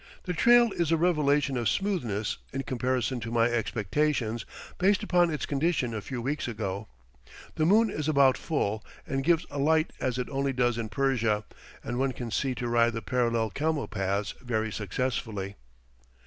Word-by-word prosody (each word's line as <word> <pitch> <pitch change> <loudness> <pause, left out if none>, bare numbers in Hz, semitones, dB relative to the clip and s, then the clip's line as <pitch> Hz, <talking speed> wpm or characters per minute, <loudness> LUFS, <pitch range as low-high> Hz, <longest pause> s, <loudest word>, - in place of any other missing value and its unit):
The 180 - -2
trail 240 +4 +5
is 170 -4 -1
a 165 - +4
revelation 150 -5 +2
of 120 -2 +1
smoothness, 125 - -1
in 135 +1 -3
comparison 130 0 -1
to 115 0 -5
my 115 0 +3
expectations, 120 +1 -1 0.3
based 195 +2 +3
upon 175 -1 +3
its 150 -2 -2
condition 140 -4 0
a 110 - -3
few 120 +3 -5
weeks 145 +2 -2
ago. 105 -3 -4 0.7
The 155 - +1
moon 215 +3 +4
is 155 -3 -2
about 140 -3 +5
full, 110 -9 -2 0.2
and 135 0 -2
gives 170 +2 +3
a 145 - -4
light 155 +2 +2
as 125 -1 -1
it 125 - -2
only 135 0 0
does 120 -2 +1
in 110 -2 -3
Persia, 115 -4 +1 0.4
and 120 - -3
one 135 0 +1
can 120 -2 -6
see 130 +2 0
to 120 - -3
ride 120 0 +3
the 115 -1 -4
parallel 115 -1 0
camel 155 +2 -1
paths 100 0 -2
very 110 -3 -1
successfully. 105 -2 -3
130 Hz, 175 wpm, -28 LUFS, 115-150 Hz, 0.7 s, trail